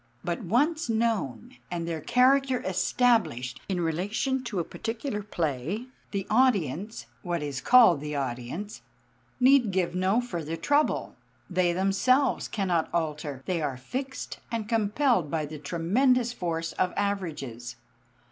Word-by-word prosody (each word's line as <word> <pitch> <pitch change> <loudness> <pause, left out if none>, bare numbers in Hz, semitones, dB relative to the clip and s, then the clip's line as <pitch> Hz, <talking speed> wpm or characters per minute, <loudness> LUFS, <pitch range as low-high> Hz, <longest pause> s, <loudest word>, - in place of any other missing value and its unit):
But 170 -1 -2
once 290 - +1
known 220 - -1
and 170 -1 -3
their 165 -2 -3
character 260 - +3
established 185 - +1
in 185 -2 0
relation 205 - -1
to 230 -5 -4
a 175 - +1
particular 225 - -4
play, 170 - -2 0.2
the 195 -2 -3
audience 215 - +1 0.2
what 175 -4 -2
is 140 -3 -4
called 230 - +6
the 150 0 -4
audience 135 - -4 0.6
need 255 -2 +5
give 185 -2 0
no 185 +5 +2
further 170 -10 -4
trouble. 290 - +1 0.3
They 180 -1 +2
themselves 195 +9 +2
cannot 180 -6 0
alter; 150 -5 -3
they 180 -3 -1
are 140 -4 -2
fixed 260 - -5
and 225 -2 -2
compelled 225 - +2
by 155 0 -1
the 150 0 -8
tremendous 235 - +1
force 165 -5 -3
of 185 - 0
averages. 150 - -3
185 Hz, 130 wpm, -27 LUFS, 160-235 Hz, 0.6 s, called